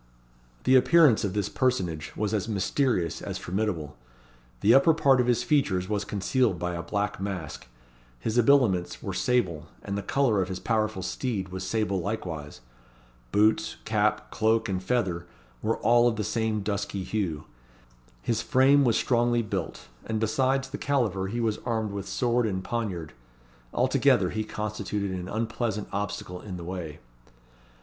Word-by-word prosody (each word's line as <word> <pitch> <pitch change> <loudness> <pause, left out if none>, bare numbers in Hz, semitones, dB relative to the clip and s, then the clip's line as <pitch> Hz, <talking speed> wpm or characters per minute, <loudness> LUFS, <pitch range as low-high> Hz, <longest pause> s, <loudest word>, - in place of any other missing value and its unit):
The 130 - +4
appearance 150 -2 +5
of 100 -3 -1
this 105 -2 0
personage 90 - -1
was 105 0 -1
as 105 -2 -1
mysterious 105 - 0
as - - -4
formidable. 90 -6 -3 0.7
The 110 - +5
upper 155 +4 +6
part 135 -5 +4
of 125 - -1
his 120 -2 +2
features 100 -12 +1
was 105 0 -1
concealed 105 0 +1
by 90 +1 -2
a 85 - -3
black 100 +3 -2
mask. 95 -10 -5 0.5
His 110 - -2
habiliments 120 -8 +3
were - - -3
sable; 95 -12 0 0.2
and 100 - -3
the 100 - -2
colour 120 -4 +2
of 95 - -2
his 95 -1 -4
powerful 110 -4 -1
steed 100 -2 -3
was 95 +1 -5
sable 100 -3 0
likewise. 80 - -5 0.7
Boots, 110 +1 +2
cap, - - 0
cloak, 110 +1 +2
and 95 -2 -2
feather, 95 -5 -1 0.3
were 115 - 0
all 120 0 +4
of 120 - +1
the 105 - -2
same 110 0 -1
dusky 100 -1 -3
hue. 90 -7 -2 0.8
His 115 -1 0
frame 140 +1 +4
was 120 -4 +3
strongly 120 -1 +2
built, 95 -6 -4 0.2
and 110 -1 -1
besides 130 +4 +1
the 145 - -5
caliver 110 -9 0
he 115 +5 -3
was 110 -2 0
armed 110 -3 -1
with 100 -1 -5
sword 120 -1 +1
and 95 -2 -2
poniard. 95 -10 -3 0.6
Altogether, - - +3
he 110 - -2
constituted 105 -2 -3
an 90 0 -5
unpleasant 110 -1 -2
obstacle 100 -3 -4
in 95 -4 -7
the 85 - -7
way. 85 -4 -5
105 Hz, 155 wpm, -27 LUFS, 95-120 Hz, 0.8 s, upper